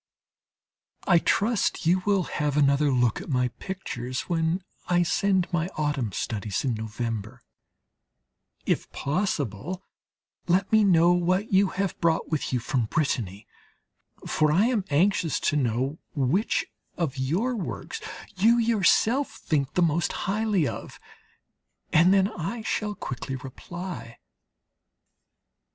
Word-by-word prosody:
I 175 -4 +5
trust 210 0 +1
you 180 +3 +3
will 200 -3 +3
have 150 -3 -2
another 140 0 +4
look 125 -4 +2
at - - -9
my 125 -2 +1
pictures 130 -10 -4
when 170 +1 -1 0.2
I 175 0 +3
send 185 +2 +1
my 170 0 +1
autumn 145 -7 -1
studies 105 +4 -3
in 125 - +1
November; 110 +1 -5 1.2
if - - -1
possible, 150 - -2 0.6
let 190 +3 +2
me 220 -1 +5
know 175 -3 +5
what 185 +4 0
you 195 +1 +5
have 195 -1 -3
brought 165 -1 +1
with 155 - -1
you 125 - +1
from 120 0 -1
Brittany; 110 - -2 0.8
for 155 -1 +2
I 185 +8 +4
am 230 -6 +1
anxious 165 +1 +2
to - - +1
know 130 +2 0 0.2
which 145 - +1 0.3
of 145 -6 -2
your 185 - 0
works 230 - -5 0.3
you 225 +6 +4
yourself 230 +4 +3
think 145 -10 -1
the 180 - +4
most 170 +1 +1
highly 205 -5 +1
of. - - -7 0.9
And 170 +4 +6
then 195 -1 +4
I 205 +4 -5
shall 210 -1 -2
quickly 135 -4 -5
reply. 140 +1 -8
165 Hz, 125 wpm, -26 LUFS, 135-195 Hz, 1.2 s, And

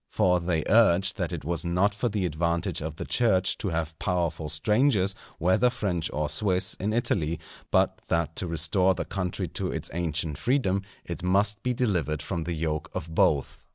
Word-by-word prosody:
For 90 -1 +2
they 85 -2 0
urged 100 -3 +4
that 85 -5 -2
it 85 -5 -5
was 85 0 -2
not 90 +4 +2
for 110 +4 -1
the 100 -3 -1
advantage 85 +1 -1
of 80 0 -4
the - - -5
Church 95 -6 +2
to 100 - -2
have 80 -1 -3
powerful 85 -3 -1
strangers, 105 - +2 0.2
whether 95 +8 +3
French 90 -9 -2
or 75 0 -1
Swiss, 90 +4 +2
in 100 +3 -1
Italy; 95 -9 0 0.3
but - - +2
that 85 -1 0
to 90 - -2
restore 85 +3 +2
the - - -3
country 90 -2 -3
to - - -3
its - - -4
ancient 80 -3 -2
freedom, 120 -7 +1 0.2
it 85 +1 -5
must 100 +3 +2
be 125 +2 -1
delivered 85 - 0
from 85 -4 -3
the 85 - -2
yoke 75 -1 -2
of 80 -3 -5
both. 75 -3 +1
90 Hz, 185 wpm, -27 LUFS, 80-100 Hz, 0.3 s, urged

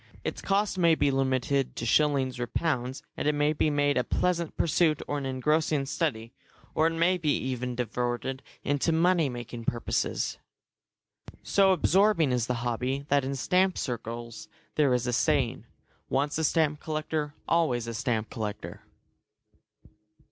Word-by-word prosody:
Its - - -4
cost 200 -1 0
may 170 -2 +5
be 145 - +2
limited 135 0 0
to 115 - -4
shillings 135 -1 +2
or 120 - -2
pounds, 130 -2 -2
and - - -2
it 150 - +2
may 145 +1 +2
be 155 - +1
made 145 -1 +2
a - - +1
pleasant 170 +1 -1
pursuit 160 -2 +2
or 145 - -1
an 135 - -4
engrossing 150 +2 +1
study, 120 -6 -2 0.4
or 160 - +3
it 165 - -1
may 170 +3 +2
even 130 -6 -1
be - - -8
diverted 120 +3 -3 0.2
into 145 +3 +1
money 165 -2 +3
making 120 -1 -7
purposes. 120 +1 -1 1.0
So 195 -1 +4
absorbing 185 -3 +3
is 120 -2 0
the 125 - 0
hobby 125 +4 -2
that 140 -1 +3
in 135 +1 -2
stamp 185 +7 +2
circles 115 -2 -5 0.3
there 145 -3 +3
is 125 -1 +1
a 125 - -1
saying, 120 - +1 0.4
"Once 140 +2 0
a - - 0
stamp 155 -1 +2
collector, 155 -1 -3
always 145 -9 +1
a 115 - -5
stamp 115 -2 -2
collector." 105 -2 -5
140 Hz, 155 wpm, -28 LUFS, 125-160 Hz, 1.0 s, may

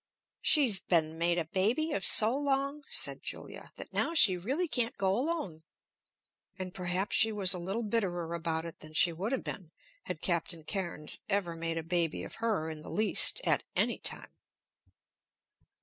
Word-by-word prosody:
"She's 250 -10 +4
been 160 -2 0
made 170 +1 +2
a 170 - -1
baby 220 - 0
of - - -2
so 225 +2 +6
long," 280 +1 -1
said - - 0
Julia, - - -6
"that - - -9
now 335 - 0
she 190 - +7
really 265 - -2
can't 240 -6 0
go 190 -1 +1
alone." 255 - -3 1.0
And 185 -1 -6
perhaps 185 +2 -1
she 220 - +5
was 200 -3 +4
a 180 - -3
little 195 +7 -3
bitterer 180 -6 -2
about 165 -1 -2
it 165 - -8
than 155 0 -13
she 170 +1 +5
would 190 +8 -4
have 265 - -2
been 180 -5 -7 0.4
had 160 - -5
Captain 170 -2 -1
Cairnes 170 -4 -2
ever 195 -4 0
made 165 0 -3
a 165 - -3
baby 170 -1 -1
of - - -9
her 215 -9 0
in 155 -1 -8
the - - -10
least, 215 - +2
at - - +2
any - - 0
time. - - -2
185 Hz, 175 wpm, -31 LUFS, 165-230 Hz, 1.0 s, she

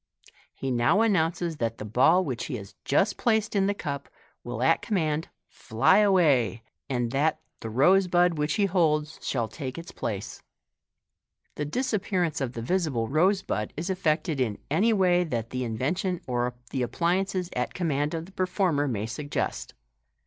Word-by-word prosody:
He 135 - -3
now 120 - +3
announces 170 -5 +1
that 115 -3 -2
the 105 - -6
ball 160 - +4
which 130 -5 -3
he 140 - -4
has 100 -4 -8
just 195 +9 +2
placed 220 -3 +1
in 195 -1 +3
the 205 - 0
cup 140 -6 -5 0.3
will 120 0 -4
at 165 +5 +3
commaud 160 -7 0 0.2
fly 115 - +2
away, 145 - +3 0.3
and 120 -3 -1
that 150 +4 +1 0.2
the 115 - -6
rose 180 - +4
bud 175 0 +3
which 150 0 0
he 205 - +2
holds 155 -5 +1
shall 120 -4 -1
take 130 +4 -6
its 170 +1 -8
place. 100 -3 -5 1.1
Tne 150 0 -3
disappearance 190 - -1
of 130 -2 -2
the 115 - -5
visible 140 -7 0
rose 185 +7 +3
bud 105 0 -3
is 170 +5 -2
effected 155 -4 0
in 110 -5 0
any 205 +10 +3
way 180 -4 +3
that 115 -9 -3
the 130 0 -2
invention 155 - -1
or 125 -1 -1 0.2
the 130 - -1
appliances 180 +6 0
at 125 - -2
command 150 -3 0
of 165 0 -4
the 190 - -15
performer 180 -6 0
may 110 -5 -2
suggest; 140 +6 -3
and - - -42
Fig. - - -48
155 Hz, 170 wpm, -27 LUFS, 125-185 Hz, 1.1 s, ball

